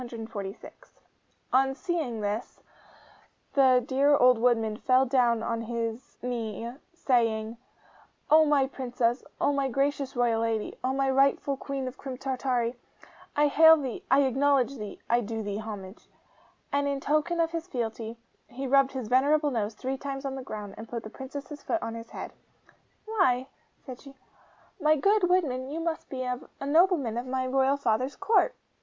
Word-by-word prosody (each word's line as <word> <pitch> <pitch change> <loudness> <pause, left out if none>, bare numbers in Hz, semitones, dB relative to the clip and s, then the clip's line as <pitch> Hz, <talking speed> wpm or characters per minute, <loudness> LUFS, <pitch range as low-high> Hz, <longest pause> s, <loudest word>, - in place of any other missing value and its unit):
246.' 225 -4 -8 0.6
On 270 +1 +3
seeing 265 -6 -2
this, 210 +3 -3 0.9
the 260 -3 +5
dear 280 +3 +3
old 250 -3 +5
woodman 225 -3 +2
fell 255 +3 +3
down 240 -3 +2
on 230 0 -2
his 230 +2 -4
knee, 235 -2 -4 0.2
saying, 230 -8 0 0.8
'O 315 +1 +8
my 290 -3 +3
Princess, 245 -2 -1 0.2
O 285 - +2
my 275 -1 0
gracious 275 +1 -1
royal 235 -2 +2
lady, 225 -2 -1
O 255 - +1
my 270 0 0
rightful 275 +1 +2
Queen 270 -1 -4
of 255 - -8
Crim 265 -2 -6
Tartary, 255 -3 -1 0.6
I 295 - +4
hail 320 +2 +7
thee 265 -5 -5
I 275 +2 +5
acknowledge 275 0 +2
thee 210 -3 -7
I 240 +1 +3
do 225 0 -4
thee 205 0 -3
homage!' 205 -2 -8 0.6
And 285 0 +1
in 280 -1 -1
token 305 +5 0
of 330 -1 +2
his 335 0 -4
fealty, 230 -4 -4 0.3
he 260 +3 -6
rubbed 275 0 +3
his 255 -4 -4
venerable 290 +5 +3
nose 220 -3 -2
three 260 +4 -4
times 275 0 -5
on 270 - -2
the 265 - -5
ground, 210 -5 -7
and 220 0 -9
put 235 -1 -5
the 215 - -9
Princess's 285 +3 -8
foot 340 - -1
on 225 - -4
his 230 0 -8
head. - - -7 0.7
'Why,' 315 - +1 0.4
said 255 -3 -9
she, 275 -1 -13 0.6
'my 305 -1 +4
good 395 +4 +3
woodman, 270 -8 +1
you 310 +3 -4
must 330 -1 -3
be 260 -1 -4
a 250 -1 -2 0.2
nobleman 290 - +2
of 250 - -6
my 260 0 -1
royal 265 +2 +2
father's 255 +1 0
Court! 445 +5 +2
260 Hz, 165 wpm, -28 LUFS, 230-280 Hz, 0.9 s, O